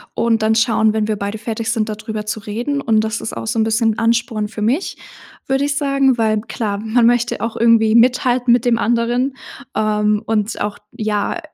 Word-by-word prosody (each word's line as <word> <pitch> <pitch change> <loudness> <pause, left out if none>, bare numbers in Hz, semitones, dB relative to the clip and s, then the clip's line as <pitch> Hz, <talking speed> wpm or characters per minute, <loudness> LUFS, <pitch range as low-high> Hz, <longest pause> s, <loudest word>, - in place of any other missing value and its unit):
und 225 -1 +1
dann 220 +1 +2
schauen, 220 -1 +2
wenn 215 -1 0
wir 215 - 0
beide 200 +2 -4
fertig 225 0 -3
sind 220 -2 -1
da 215 - -3
drüber 215 0 -6
zu 215 +1 -3
reden 240 +8 -3
und 225 -5 +2
das 220 +1 -3
ist - - -5
auch - - -5
so 225 0 -1
'n - - +4
bisschen 220 0 +1
Ansporn 230 -2 0
für 215 0 -8
mich, 270 - -1 0.5
würde 270 +1 +1
ich 285 -1 -1
sagen, 275 -3 +2
weil 215 -2 +1
klar, 210 -3 -4
man 225 +2 +1
möchte 240 0 +1
auch 230 0 -3
irgendwie 225 -1 +4
mithalten 245 0 +3
mit 240 0 +1
dem 235 -1 +2
anderen, 240 +3 0 0.4
ähm, 210 0 +1
und 215 -1 -1
auch, 205 0 -3
ja, 215 +7 -2
225 Hz, 205 wpm, -18 LUFS, 215-240 Hz, 0.5 s, n